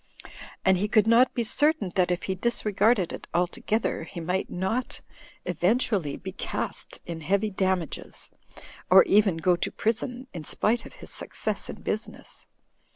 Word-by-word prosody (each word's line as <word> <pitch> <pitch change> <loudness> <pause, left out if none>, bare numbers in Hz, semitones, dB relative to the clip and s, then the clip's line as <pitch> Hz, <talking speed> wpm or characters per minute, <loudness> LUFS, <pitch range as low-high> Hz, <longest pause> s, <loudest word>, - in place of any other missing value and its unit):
And 190 -1 +4
he 205 - 0
could 215 0 +4
not 235 +3 +5
be 240 - +1
certain 290 - +2
that 180 -2 +2
if 180 -1 -1
he 190 - -1
disregarded 210 -1 +1
it - - -8
altogether, 180 +4 0
he 170 - -8
might 180 +3 -2
not 230 +9 -2 0.5
eventu 185 +9 +1
ally 160 -9 0
be 190 - -7
cast 190 - -3
in 165 -1 -6
heavy 200 +6 +1
damages— 190 -4 -2 0.6
or 190 +1 +9
even 200 -4 +3
go 175 +2 +3
to - - -2
prison, 245 +3 -2
in 165 - -6
spite 230 +9 0
of - - -15
his - - -8
success - - -3
in - - -8
business. - - -5
195 Hz, 155 wpm, -26 LUFS, 180-225 Hz, 0.6 s, or